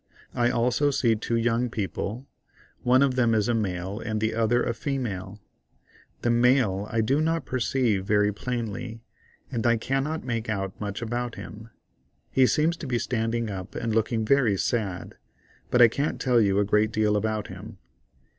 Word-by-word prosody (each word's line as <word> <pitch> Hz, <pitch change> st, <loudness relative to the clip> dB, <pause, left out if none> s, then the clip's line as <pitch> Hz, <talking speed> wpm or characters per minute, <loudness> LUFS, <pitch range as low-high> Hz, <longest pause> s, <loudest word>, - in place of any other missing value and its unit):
I 120 Hz, 0 st, +2 dB
also 125 Hz, +4 st, +2 dB
see 130 Hz, -5 st, +2 dB
two 115 Hz, +2 st, -2 dB
young 115 Hz, +1 st, +1 dB
people—one 120 Hz, +4 st, -2 dB
of 135 Hz, -2 st, +2 dB
them 120 Hz, -3 st, +2 dB
is 105 Hz, -2 st, +1 dB
a 120 Hz, -, +2 dB
male 95 Hz, -2 st, -2 dB
and 110 Hz, -1 st, -3 dB
the 110 Hz, +1 st, 0 dB
other 115 Hz, +2 st, +2 dB
a 120 Hz, -, -1 dB
female. 110 Hz, -7 st, -4 dB, 0.8 s
The 120 Hz, -, +2 dB
male 120 Hz, -5 st, +3 dB
I 115 Hz, -, +1 dB
do 135 Hz, +7 st, +1 dB
not 165 Hz, +1 st, 0 dB
perceive 120 Hz, -5 st, 0 dB
very 105 Hz, +1 st, +2 dB
plainly, 115 Hz, 0 st, -4 dB, 0.5 s
and 120 Hz, -2 st, 0 dB
I 115 Hz, 0 st, +4 dB
cannot 135 Hz, +7 st, -2 dB
make 115 Hz, -3 st, -3 dB
out 95 Hz, -3 st, -2 dB
much 105 Hz, +2 st, -4 dB
about 120 Hz, +1 st, -3 dB
him; 110 Hz, +2 st, -9 dB, 0.6 s
he 130 Hz, -1 st, +4 dB
seems 160 Hz, +5 st, +1 dB
to 160 Hz, -, -7 dB
be 125 Hz, -2 st, 0 dB
standing 115 Hz, -1 st, -1 dB
up 95 Hz, -1 st, -7 dB
and 115 Hz, -2 st, -2 dB
looking 110 Hz, 0 st, 0 dB
very 120 Hz, -5 st, +3 dB
sad, 95 Hz, -5 st, -2 dB, 0.5 s
but 125 Hz, -1 st, +6 dB
I -, -, +9 dB
can't 140 Hz, +6 st, -2 dB
tell 125 Hz, -3 st, +3 dB
you 100 Hz, -2 st, +2 dB
a 100 Hz, -, +3 dB
great 105 Hz, +1 st, +2 dB
deal 105 Hz, -1 st, +1 dB
about 110 Hz, 0 st, -1 dB
him. 100 Hz, +3 st, -10 dB
115 Hz, 170 wpm, -26 LUFS, 105-125 Hz, 0.8 s, I